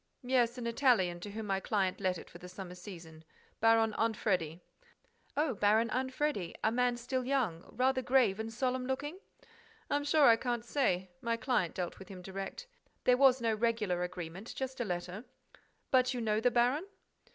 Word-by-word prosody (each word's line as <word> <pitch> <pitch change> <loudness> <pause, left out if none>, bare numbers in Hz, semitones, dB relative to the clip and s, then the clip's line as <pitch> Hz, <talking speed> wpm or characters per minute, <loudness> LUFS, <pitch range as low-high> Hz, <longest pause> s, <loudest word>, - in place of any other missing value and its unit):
"Yes, 245 -2 +2
an 245 - -5
Italian, 230 -8 +2
to 205 - -7
whom 215 +2 -5
my 195 -1 0
client 195 -2 0
let 185 -2 +1
it - - -10
for 175 - -13
the 180 - -10
summer 185 -1 -8
season: 170 -4 -11 0.4
Baron 225 -1 +4
Anfredi." 185 -7 0 0.8
"Oh, 295 -3 +2
Baron 215 +3 +3
Anfredi! 260 - -1
A 220 - +3
man 245 0 +1
still 255 +2 -2
young, 245 -11 0
rather 260 +1 +1
grave 245 -6 +3
and 220 +1 -4
solemn 255 +1 -1
looking—?" 290 +7 -3 0.7
"I'm 290 0 +1
sure 295 0 +4
I 230 -3 +7
can't 240 -1 -2
say.—My 190 -3 -1
client 230 -9 0
dealt 180 -2 -4
with 190 - -11
him 185 -2 -9
direct. 195 - -6 0.4
There 250 - +5
was 260 -1 +5
no 225 -1 +2
regular 215 -5 0
agreement, 180 +3 -6
just 265 -1 -4
a 240 - 0
letter—" 180 +2 -4 0.7
"But 255 0 +3
you - - -2
know 215 -2 +1
the 245 - +4
baron?" 250 +8 +2
225 Hz, 175 wpm, -32 LUFS, 190-255 Hz, 0.8 s, I